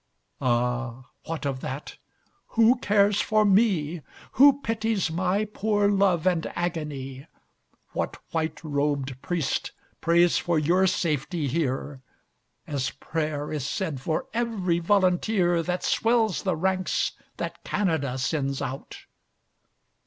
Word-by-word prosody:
Ah, 125 0 -1
what 160 -2 -4
of 135 -2 -2
that, 135 +3 -6 0.6
who 230 +2 +6
cares 205 -2 +3
for 215 0 +2
me? 190 -6 +2 0.3
Who 280 +2 +6
pities 220 -5 0
my 185 +5 +1
poor 205 0 +1
love 195 -5 +2
and 175 -3 +1
agony? 150 -5 -4 0.6
What - - -3
white 160 0 -2
robed 140 -3 -1
priest 170 -7 -2 0.3
prays 170 +1 +4
for 170 -2 0
your 175 +5 +3
safety 165 -4 -1
here, 135 -1 -2 0.6
As 135 -2 -2
prayer 150 +1 -3
is 145 -3 -2
said 155 -5 -3
for 155 +3 -1
every 215 -7 0
volunteer 180 -1 +2
That 180 +2 -2
swells 225 -3 +2
the 185 -4 0
ranks 185 +3 0 0.3
that - - -5
Canada 160 -10 0
sends 135 0 -1
out? 135 +2 -6
170 Hz, 115 wpm, -26 LUFS, 145-195 Hz, 0.6 s, who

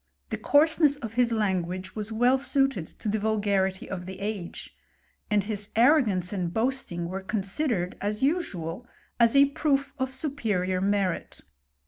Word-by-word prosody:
The - - -1
coarseness 300 0 +4
of 225 -6 -7
his 240 0 +2
language 185 -4 -1
was 215 0 -4
well 245 +4 +3
suited 270 - +1
to - - -9
the 215 +1 0
vulgarity 200 -3 0
of 180 -2 -6
the 190 0 -7
age; 200 -4 -5 0.5
and 210 -2 +2
his 205 -1 -4
ar* 280 +7 +6
rogance 185 -5 -1
and 180 -4 -2
boasting 220 -7 -1
were 190 +2 -4
considered, 195 - -1
as 210 +3 -2
usual, 240 - -1 0.3
as 235 +2 +4
e 280 - +8
proof 280 -1 0
of 260 0 -1
superior 220 - -1
merit. 195 -2 -1
215 Hz, 150 wpm, -27 LUFS, 190-260 Hz, 0.5 s, e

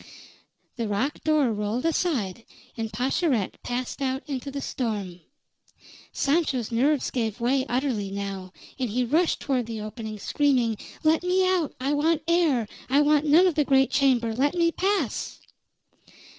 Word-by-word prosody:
The 230 -2 -2
rock 240 +8 -2
door 300 -7 +2
rolled 210 +5 -2
aside, 260 - 0 0.3
and 225 -1 -4
Pascherette 255 - 0
passed 250 +3 -4
out 265 0 -1
into 275 -1 -4
the 280 0 -5
storm. 205 -10 -4 0.9
Sancho's 275 -6 0
nerves 270 +5 +1
gave 225 -2 -2
way 260 +3 +1
utterly 245 -6 -1
now, 195 -2 -5 0.3
and 255 -3 -1
he 250 +4 0
rushed 320 +8 +1
toward 255 -4 -1
the 225 -1 -5
opening, 215 0 -6
screaming: 250 -2 +1 0.3
"Let 315 +1 +3
me 365 +1 +2
out! 360 -5 0
I 270 +3 0
want 310 +1 +1
air! 320 -10 +2 0.2
I 280 +3 +4
want 300 0 +3
none 325 +5 +6
of 365 - +3
the 300 0 +2
great 270 -1 +3
chamber! 250 -5 +2
Let 280 +8 +1
me 335 -1 +3
pass!" 375 - -1
265 Hz, 150 wpm, -25 LUFS, 225-300 Hz, 0.9 s, none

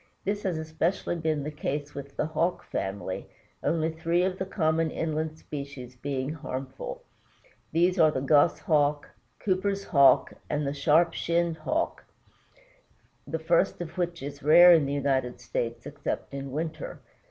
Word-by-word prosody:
This 205 +1 -1
has 185 -5 -1
especially 160 +3 -1
been 160 -3 -1
the 150 - -4
case 150 0 -4
with 140 0 -9
the - - +1
Hawk 165 +3 -1
family, 95 -1 -4 0.3
only 160 0 +1
three 165 +2 +1
of 185 0 -1
the 190 - -2
common 160 -3 +1
inland 155 0 -2
species 140 -5 -8
being 135 +1 -3
harmful. 135 -4 -6 0.7
These 175 +3 +2
are 160 -1 +7
the 150 - -1
Goshawk, 145 +1 +2 0.3
Cooper's 195 +1 0
Hawk, 140 -6 +5 0.2
and 150 0 -1
the 140 - -1
Sharp 160 +4 +3
shinned 170 -1 0
Hawk, 310 - -2 1.2
the 160 - -2
first 170 +3 +2
of 170 -2 -6
which 175 -3 -2
is 140 0 -7
rare 175 +4 +8
in 155 -4 +4
the 140 - -2
United 135 -4 0
States, 115 -1 -3
except 145 -1 -4
in 140 0 -5
winter. 155 +1 -4
155 Hz, 150 wpm, -28 LUFS, 140-170 Hz, 1.2 s, rare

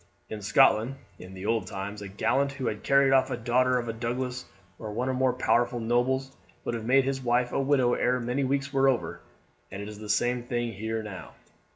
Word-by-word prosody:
In 110 -1 -5
Scotland 110 +5 +4 0.2
in 95 +1 -10
the 95 +1 -7
old 110 -3 0
times 100 +2 -6
a 100 - -6
gallant 125 +8 0
who 135 -2 -5
had 105 -2 -2
carried 140 -1 +4
off 130 0 +4
a 125 - -2
daughter 125 +2 +2
of 120 -1 -3
a 115 - -2
Douglas 125 +2 -3 0.3
or 110 -2 -6
one 120 +5 -2
of 130 0 -1
our 130 -1 +4
powerful 120 -1 +1
nobles 130 +3 0 0.3
would - - -2
have 115 -2 -4
made 135 +3 +4
his 135 0 -2
wife 120 0 +1
a - - 0
widow 135 -3 +2
ere 125 +1 +1
many 125 +4 -1
weeks 135 +1 -1
were 135 0 +4
over, 130 - -2 0.5
and 95 - -7
it 100 - -6
is 105 -1 -9
the 105 -1 -9
same 120 +2 +1
thing 120 -1 -3
here 110 +2 -3
now. 100 -4 -9
120 Hz, 220 wpm, -27 LUFS, 110-130 Hz, 0.5 s, Scotland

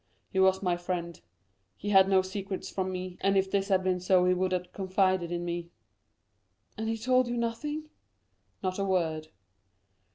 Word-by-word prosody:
He 190 - 0
was 190 +1 +4
my 175 -2 +1
friend: 175 -1 -4 0.6
he 205 - -4
had 190 -1 +6
no 190 -1 +4
secrets 190 0 -5
from 190 -1 -2
me, 185 -1 -5
and 195 0 +3
if 190 0 +1
this 195 -1 +1
had 190 -2 +2
been 185 -1 +1
so 180 0 +3
he 180 - +4
would 185 +1 0
have 180 -1 -2
confided 185 -2 +1
in 175 0 -2
me." 170 0 -4 1.1
"And 220 0 -3
he 225 - -1
told 255 +2 +2
you 240 0 -2
nothing?" 295 +7 -3 0.7
"Not 185 +1 -1
a - - +1
word." 165 -5 0
190 Hz, 175 wpm, -29 LUFS, 180-200 Hz, 1.1 s, had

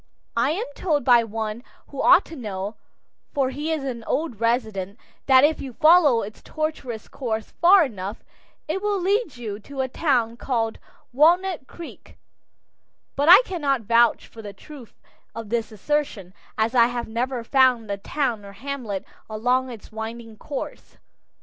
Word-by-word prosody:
I 235 +4 +2
am 400 +7 -2
told 300 -3 0
by 240 -2 +6
one 220 +1 -5 0.3
who - - -5
ought - - +6
to 330 - -10
know 205 -4 -5 0.6
for 270 -2 +1
he 295 +4 -3
is 310 -3 -2
an 245 -4 -5
old 295 -8 -2
resident 220 -4 -1 0.3
that 265 -1 +6
if 310 +2 +3
you 265 -3 -7
follow 310 -4 +5
its 215 +2 -9
tortuous 295 -8 -4
course 220 -5 -4
far 360 0 +7
enough, 205 -4 -7 0.4
it 340 +5 -2
will 410 -1 0
lead 380 - 0
you 215 -4 -6
to 270 +5 -6
a 260 - -1
town 245 -5 0
called 230 -4 -2 0.3
Walnut 335 +1 +3
Creek, 340 -2 -12 1.0
but 285 +3 +2
I 370 - +10
cannot 285 -8 -1
vouch 230 +1 +3
for 225 - -12
the 205 -2 -8
truth 260 +3 -14 0.4
of 225 -2 -7
this 230 0 -2
assertion, 215 -5 -2 0.2
as 220 +2 +1
I 235 -2 +5
have 245 -1 -4
never 240 +2 -2
found 250 -4 +3
a 200 - -2
town 235 0 -2
or 200 0 -11
hamlet 230 -4 -5 0.2
along 250 +4 0
its 230 -3 -11
winding 225 +1 -7
course. 275 +6 -7
245 Hz, 160 wpm, -23 LUFS, 220-290 Hz, 1.0 s, I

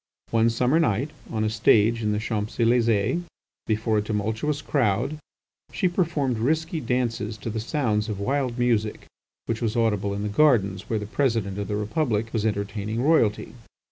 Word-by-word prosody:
One 115 0 +3
summer 125 +7 +2
night, 140 -1 +1 0.2
on 110 -1 -1
a 110 - +1
stage 110 +1 +3
in 105 -1 0
the 105 - 0
Champs 110 -1 -3
Elysées 115 +3 +2 0.5
before 110 -1 +1
a - - 0
tumultuous 110 +8 -2
crowd, 130 +2 0 0.5
she 185 - +1
performed 160 - 0
risky 160 +6 0
dances 115 -4 -1
to 115 - -5
the 110 - -3
sounds 110 -4 -1
of 105 -2 -3
wild 130 +2 -1
music 115 -3 0 0.4
which 115 0 -3
was 115 -1 -1
audible 105 -4 +1
in 100 - -3
the - - -1
gardens 105 -5 +2
where 110 - 0
the 105 - -4
President 110 -5 -1
of 100 - -3
the 105 - -2
Republic 115 0 -1
was 110 -1 +1
entertaining 105 +2 -2
Royalty. 135 -9 +2
115 Hz, 170 wpm, -25 LUFS, 105-125 Hz, 0.5 s, One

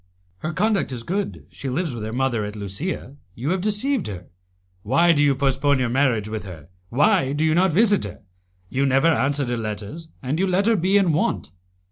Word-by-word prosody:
"Her 155 - -3
conduct 200 -1 +1
is 120 -3 -5
good, 195 - -3
she 135 - -6
lives 155 +2 -1
with 115 -3 -6
her 110 - -4
mother 120 -2 0
at 105 +1 -5
Lusia; 125 - -5 0.2
you 135 +8 -2
have 185 0 0
deceived 215 +4 0
her. 90 -4 -8 0.5
Why 140 - +4
do 150 -3 +3
you 145 -2 +4
postpone 140 +1 +2
your 125 -2 0
marriage 125 -5 +1
with 110 0 -4
her? 85 -6 -10 0.2
Why 145 - +3
do 150 +2 +1
you 155 - +3
not 180 +2 +3
visit 205 +4 +3
her? - - -9 0.4
You 135 +7 0
never 135 +5 +4
answer 140 -2 +1
her 120 -1 -2
letters, 110 +8 -5 0.2
and 135 +5 -1
you 195 - +2
let 185 +2 +2
her 230 0 +4
be 190 +2 +3
in 185 -5 +3
want." 115 - -1
140 Hz, 205 wpm, -23 LUFS, 120-180 Hz, 0.5 s, Why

